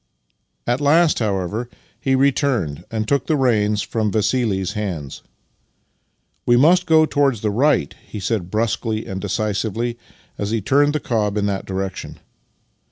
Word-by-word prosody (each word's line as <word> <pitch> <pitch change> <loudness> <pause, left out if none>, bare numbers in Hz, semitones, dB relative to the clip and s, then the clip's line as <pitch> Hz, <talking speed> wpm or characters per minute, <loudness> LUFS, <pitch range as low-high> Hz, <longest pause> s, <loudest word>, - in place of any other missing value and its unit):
At 120 +4 0
last, 155 +3 +4
however, 105 +2 -2 0.3
he 135 -1 +1
returned, 125 - +1
and 110 -1 -2
took 140 -1 +1
the 155 - +2
reins 105 -6 +2
from 110 -3 -1
Vassili's 105 -3 0
hands. 90 -10 -4 0.6
" - - -47
We 120 - +5
must 180 +7 +4
go 160 -1 +5
towards 140 -7 +1
the 105 - 0
right," 130 - +2
he 105 - -7
said 100 -2 -2
brusquely 110 +1 -1
and 95 0 -5
decisively 110 +3 -2 0.4
as 100 - -2
he 115 +1 0
turned 145 +8 +2
the 150 - 0
cob 105 -6 -1
in 100 - +1
that 100 -1 -2
direction. 95 0 -4
110 Hz, 150 wpm, -20 LUFS, 100-135 Hz, 0.6 s, We